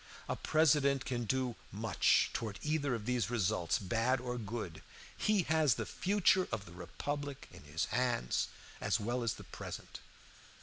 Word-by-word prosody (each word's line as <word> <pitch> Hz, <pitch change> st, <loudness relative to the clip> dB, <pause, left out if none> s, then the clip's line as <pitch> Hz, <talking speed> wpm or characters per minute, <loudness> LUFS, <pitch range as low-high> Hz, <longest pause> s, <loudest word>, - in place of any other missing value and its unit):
A -, -, -1 dB
President 145 Hz, -4 st, +3 dB
can 120 Hz, -2 st, -2 dB
do 130 Hz, +1 st, 0 dB, 0.2 s
much -, -, +3 dB
toward 110 Hz, -3 st, -3 dB
either 150 Hz, -4 st, +1 dB
of 110 Hz, -2 st, -6 dB
these 125 Hz, -3 st, +1 dB
results, 105 Hz, -7 st, +1 dB
bad 115 Hz, +6 st, +1 dB
or 125 Hz, 0 st, -3 dB
good. 100 Hz, -8 st, -5 dB, 0.3 s
He 210 Hz, -3 st, +2 dB
has 155 Hz, -6 st, +3 dB
the -, -, -3 dB
future 190 Hz, -1 st, +3 dB
of 110 Hz, -3 st, -3 dB
the 85 Hz, -, -12 dB
republic 145 Hz, +10 st, -5 dB
in 70 Hz, -, -13 dB
his 80 Hz, +4 st, -1 dB
hands, 125 Hz, -, +1 dB, 0.3 s
as -, -, +1 dB
well 120 Hz, +4 st, -1 dB
as 115 Hz, -3 st, 0 dB
the -, -, -10 dB
present. -, -, -8 dB
125 Hz, 160 wpm, -34 LUFS, 105-145 Hz, 0.3 s, President